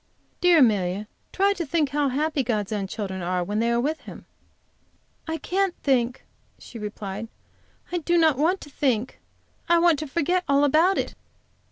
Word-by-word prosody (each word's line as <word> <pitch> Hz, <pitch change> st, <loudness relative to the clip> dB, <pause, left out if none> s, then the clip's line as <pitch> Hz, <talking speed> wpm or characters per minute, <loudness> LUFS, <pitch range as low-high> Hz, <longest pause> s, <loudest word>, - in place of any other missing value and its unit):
"Dear 355 Hz, -1 st, +5 dB
Amelia, 205 Hz, -, +2 dB, 0.2 s
try 395 Hz, +1 st, +2 dB
to 365 Hz, -4 st, -3 dB
think 310 Hz, -1 st, 0 dB
how 285 Hz, 0 st, +1 dB
happy 295 Hz, +2 st, 0 dB
God's 215 Hz, -5 st, -2 dB
own 200 Hz, -2 st, -2 dB
children 190 Hz, -2 st, -5 dB
are 180 Hz, +1 st, -1 dB
when 205 Hz, +4 st, -2 dB
they 230 Hz, +1 st, +1 dB
are 235 Hz, -, +2 dB
with 300 Hz, +6 st, -1 dB
Him." -, -, -11 dB, 1.0 s
"I 320 Hz, 0 st, -2 dB
can't 380 Hz, +1 st, -1 dB
think," 250 Hz, -3 st, +1 dB, 0.3 s
she 235 Hz, -, -11 dB
replied. 210 Hz, 0 st, -6 dB, 0.6 s
"I 355 Hz, -, 0 dB
do 345 Hz, +2 st, +1 dB
not 320 Hz, -3 st, +4 dB
want 350 Hz, +6 st, +2 dB
to 290 Hz, -, -11 dB
think. 255 Hz, -4 st, -1 dB, 0.5 s
I 340 Hz, -, +5 dB
want 335 Hz, -3 st, +4 dB
to 310 Hz, -, -4 dB
forget 340 Hz, +5 st, 0 dB
all 280 Hz, +1 st, +4 dB
about 320 Hz, +7 st, +4 dB
it. -, -, -2 dB
280 Hz, 175 wpm, -24 LUFS, 215-335 Hz, 1.0 s, Dear